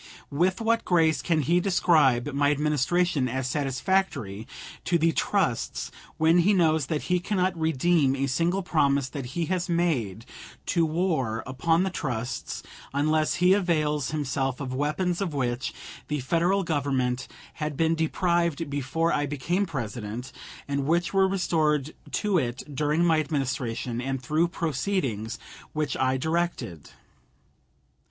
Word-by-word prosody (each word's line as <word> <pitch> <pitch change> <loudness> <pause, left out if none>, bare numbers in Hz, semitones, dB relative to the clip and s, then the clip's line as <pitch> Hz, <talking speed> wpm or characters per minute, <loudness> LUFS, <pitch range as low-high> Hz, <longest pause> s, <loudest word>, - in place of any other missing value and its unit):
With 180 +6 +1
what 230 +1 +2
grace 165 -3 +3
can 160 -3 +1
he 170 +6 +3
describe 155 -8 +3
my 145 +1 +3
Administration 150 0 +1
as 130 +1 -2
satisfactory 135 - -1 0.4
to 175 - +2
the 165 0 +3
trusts 175 - -1 0.3
when 165 +2 +4
he 195 +5 +4
knows 160 -6 +3
that 155 -3 -2
he 180 0 +1
cannot 185 -1 0
redeem 160 -2 +2
a 135 0 0
single 170 +8 0
promise 140 -5 +2
that 135 -3 -5
he 170 - +1
has 180 -1 -2
made 130 - 0 0.4
to 170 -2 +2
war 155 -10 0
upon 165 +7 +1
the 190 - -1
trusts 125 -6 -4 0.3
unless 155 +2 +2
he 180 +1 +5
avails 155 -7 +1
himself 135 -3 -1
of 130 -3 -4
weapons 155 +7 -1
of 175 -7 -2
which 125 -1 -1 0.4
the 150 -1 -1
Federal 170 +8 +1
Government 135 -5 -1 0.3
had 150 -2 -2
been 165 +1 +3
deprived 165 -1 0
before 145 +4 0
I 145 0 0
became 170 +8 -1
President, 120 -4 -5 0.4
and 140 -1 -1
which 170 +3 +1
were 195 -1 +4
restored 155 -6 +1 0.2
to 205 -4 +2
it 125 -2 -3
during 150 +4 +1
my 165 -2 +4
Administration 130 -5 -2
and 135 +1 -2
through 155 +7 +1
proceedings 140 - -2 0.4
which 150 -2 -1
I 130 0 +1
directed? 160 - -2
155 Hz, 140 wpm, -26 LUFS, 135-175 Hz, 0.4 s, he